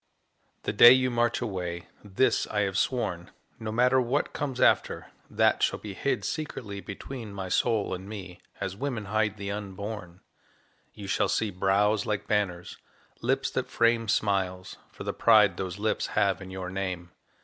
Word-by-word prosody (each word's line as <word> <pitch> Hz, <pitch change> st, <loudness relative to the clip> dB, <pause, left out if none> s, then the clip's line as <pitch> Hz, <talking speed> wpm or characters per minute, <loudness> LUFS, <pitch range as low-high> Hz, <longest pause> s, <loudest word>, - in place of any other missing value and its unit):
The -, -, -2 dB
day 120 Hz, +3 st, +10 dB
you 130 Hz, -1 st, +2 dB
march 120 Hz, 0 st, +1 dB
away 90 Hz, -6 st, -4 dB, 0.2 s
this 110 Hz, +4 st, +1 dB
I 105 Hz, -, 0 dB
have 100 Hz, -2 st, -1 dB
sworn, 95 Hz, -7 st, -1 dB, 0.3 s
No 110 Hz, -1 st, -4 dB
matter 125 Hz, +3 st, +4 dB
what 125 Hz, +4 st, -1 dB
comes 135 Hz, -3 st, -3 dB
after, -, -, +2 dB, 0.2 s
that -, -, +2 dB
shall -, -, +2 dB
be 105 Hz, -2 st, -8 dB
Hid 140 Hz, -, -1 dB
secretly 120 Hz, -10 st, -4 dB
between 110 Hz, +3 st, -7 dB
my 95 Hz, -2 st, -5 dB
soul 110 Hz, 0 st, +1 dB
and 95 Hz, +2 st, -6 dB
me 95 Hz, -4 st, -8 dB, 0.2 s
As 95 Hz, -, -3 dB
women 125 Hz, -3 st, -3 dB
hide 110 Hz, +1 st, 0 dB
the 100 Hz, 0 st, -4 dB
unborn 100 Hz, -2 st, -6 dB, 0.7 s
You 105 Hz, -, -8 dB
shall 100 Hz, 0 st, +1 dB
see 110 Hz, 0 st, 0 dB
brows 100 Hz, +3 st, +2 dB
like 105 Hz, -2 st, -1 dB
banners, 95 Hz, -5 st, -1 dB, 0.4 s
lips -, -, 0 dB
that -, -, -2 dB
frame 115 Hz, -1 st, +2 dB
Smiles, 95 Hz, -3 st, 0 dB, 0.2 s
for -, -, -9 dB
the -, -, -3 dB
pride 105 Hz, -5 st, +5 dB
those 95 Hz, -1 st, -4 dB
lips 110 Hz, +1 st, -1 dB
have 100 Hz, -3 st, +2 dB
in 95 Hz, -, -8 dB
your 95 Hz, -1 st, -6 dB
name. 90 Hz, -2 st, -4 dB
105 Hz, 165 wpm, -28 LUFS, 95-115 Hz, 0.7 s, day